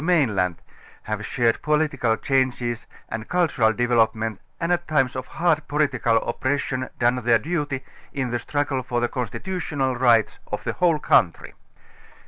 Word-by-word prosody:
mainland 110 - +2 0.4
have 105 -1 -4
shared 115 +1 +1
political 150 -7 +1
changes 125 -4 0 0.2
and 110 0 -5
cultural 160 -11 +2
developement 110 -2 +1 0.2
and 170 +1 -1
at 175 0 -2
times 135 -5 +1
of 130 0 -4
hard 165 -2 +1
political 135 -6 +2
oppres 130 +4 -1
sion 130 -2 -3
done 120 +1 +2
their 120 -1 +3
duty 145 0 -3 0.3
in 130 -3 -2
the 120 - 0
struggle 140 +1 -1
for 120 -1 -2
the 120 - +1
constitutional 130 - -2
rights 120 -3 +3
of - - -3
the - - -2
whole 170 -3 +2
country. 90 - +2
130 Hz, 145 wpm, -23 LUFS, 115-145 Hz, 0.4 s, their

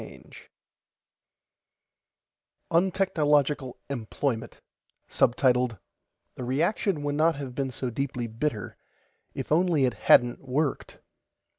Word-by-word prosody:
net - - -13 2.2
Untechnological 150 -7 +1
Employment 120 -1 -3 0.5
The 125 -2 +2 0.6
reaction 150 - 0
would 145 0 -1
not 160 +2 +3
have 140 -3 -6
been 135 0 -2
so 125 0 -4
deeply 135 0 -3
bitter 115 0 -3 0.6
if - - -5
only 165 -3 +3
it 125 - 0
hadn't 120 +3 +4
worked.... 140 +2 -2
140 Hz, 90 wpm, -27 LUFS, 125-155 Hz, 2.2 s, hadn't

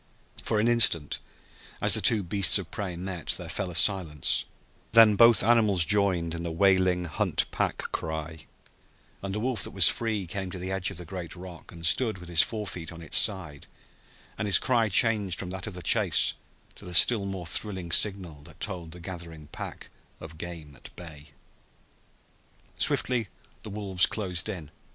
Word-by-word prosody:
For 105 - -2
an 110 - +1
instant, 115 -11 +2 0.6
as - - +5
the - - +7
two 110 -3 +3
beasts 100 +3 +5
of 95 -5 -8
prey 95 -4 -5
met, 90 -1 -5
there - - -9
fell 95 -3 -4
a 90 - -9
silence; 85 -8 +1 0.5
then 115 -2 +6
both 115 +1 +6
animals 105 -6 +2
joined 95 -5 0
in 85 - -6
the 85 - -5
wailing 95 0 +1
hunt 80 - -2
pack - - -2
cry, 80 0 -6 0.7
and 95 0 -5
the - - -3
wolf 125 +1 -2
that - - -1
was 95 -4 +7
free 110 -4 -3
came 95 +2 -6
to 95 - -8
the 90 +1 -6
edge 95 -2 -1
of - - -11
the 90 - -10
great 90 0 -8
rock 90 -2 -12
and 85 -1 -8
stood 110 +4 +1
with 90 -1 -12
his 85 -1 +6
fore 110 -2 -3
feet 85 -4 -6
on 85 0 -11
its 80 - -1
side, 80 -3 +3 0.7
and 105 - -2
his 95 - +6
cry 115 -4 0
changed 105 -3 +1
from 90 -1 -5
that 95 +2 -7
of 105 - -8
the 90 - -9
chase - - +2 0.4
to - - -18
the 90 - -6
still 105 +2 +5
more 95 -3 -6
thrilling 90 0 -1
signal 90 -6 +2
that - - -16
told 85 -3 -5
the 90 - -11
gathering 85 -4 -9
pack - - -9 0.3
of 80 0 -12
game 85 -4 -9
at - - -13
bay. 75 -4 -12 1.5
Swiftly 120 -4 +1 0.3
the - - -10
wolves 100 -3 0
closed 95 -2 -3
in. 85 -8 -8
90 Hz, 185 wpm, -26 LUFS, 85-105 Hz, 1.5 s, the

